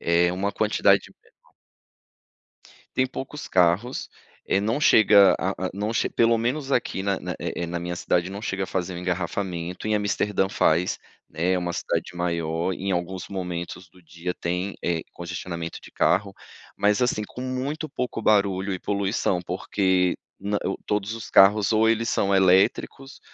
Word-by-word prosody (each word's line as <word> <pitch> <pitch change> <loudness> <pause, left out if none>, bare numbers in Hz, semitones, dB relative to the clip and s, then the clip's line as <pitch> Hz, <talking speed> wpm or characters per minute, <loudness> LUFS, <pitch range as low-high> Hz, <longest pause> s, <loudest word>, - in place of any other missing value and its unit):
É 85 +1 +3
uma 100 +3 -2
quantidade 105 +1 +2
menor. - - -28 1.6
Tem 130 - +3
poucos 135 +3 -7
carros, 90 +8 +1 0.4
eh, 95 - +2
não 110 +8 0
chega 105 - +6
a 95 0 -2
a - - -3
não 105 +2 -2
che - - +1
pelo 115 0 +3
menos 135 +5 -2
aqui 120 -7 0
na 100 -1 0
na, - - -5
eh - - -3
eh, - - -2
na 85 0 -4
minha 85 0 -4
cidade 90 +1 0
não 100 - -6
chega 95 -3 -3
a - - -1
fazer 90 -1 -3
um - - -5
engarrafamento. 90 +1 -3
Em 105 - +2
Amsterdã 100 -1 0
faz, 90 -2 +1 0.3
né, 85 +4 0
é - - +1
uma 90 -1 -2
cidade 90 +1 -3
maior, 85 0 -1
em 95 +2 -3
alguns 90 +1 -3
momentos 90 -1 -5
do 90 - -20
dia 85 +1 -5
tem, 90 +3 -3
eh, 85 -2 -1
congestionamento 85 -1 -6
de - - -13
carro, 100 +1 +1 0.4
mas 105 +3 +2
assim, 120 -3 +1
com 125 - -10
muito 135 +5 -3
pouco 125 -4 -4
barulho 100 -2 +2
e 95 - -3
poluição, 100 -2 0
porque 90 0 0 0.2
no 100 +1 -2
o 95 - -1
todos 105 +1 -1
os 115 - -8
carros 100 +2 +5
ou 110 +1 +4
eles 115 0 +1
são 100 - +1
elétricos, 95 +8 +2
95 Hz, 170 wpm, -25 LUFS, 90-105 Hz, 1.6 s, chega